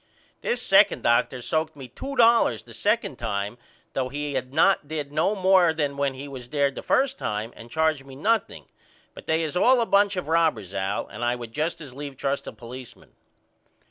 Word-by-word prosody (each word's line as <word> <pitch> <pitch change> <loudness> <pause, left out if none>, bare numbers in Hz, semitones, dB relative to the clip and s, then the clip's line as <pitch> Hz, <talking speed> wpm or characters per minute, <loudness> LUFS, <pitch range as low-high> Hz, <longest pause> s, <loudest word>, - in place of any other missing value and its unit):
This - - -1
second - - +4
Dr. 120 +1 +2
soaked 160 +2 -1
me 135 -3 -9
2 270 - -7
dollars 230 - +4
the - - -14
2d - - 0
time 100 +3 -3 0.3
though 130 -1 -1
he 145 +1 -4
had 130 -1 -3
not 160 +1 +3
did 150 -2 -4
no 160 +8 +1
more 185 -3 +4
than 145 -3 -1
when 140 -1 -1
he 140 +2 -7
was 130 -3 -9
there 140 -1 +1
the - - -7
1st 270 0 +1
time 105 +3 -3
and 115 - -12
charged 160 -1 +1
me 135 -1 -12
nothing 220 +11 0 0.5
but - - -12
they 160 +1 +1
is 155 0 -3
all 250 +7 +5
a 230 - +2
bunch 200 -1 +3
of 180 - -4
robbers 160 - +1
Al 100 +1 -2
and 105 +4 -8
I 120 +1 +1
would 120 -2 -8
just 165 +4 -2
as 140 -5 -9
leave 140 0 -7
trust 140 +1 -2
a - - -4
policeman. 125 +1 -11
145 Hz, 205 wpm, -25 LUFS, 125-165 Hz, 0.5 s, all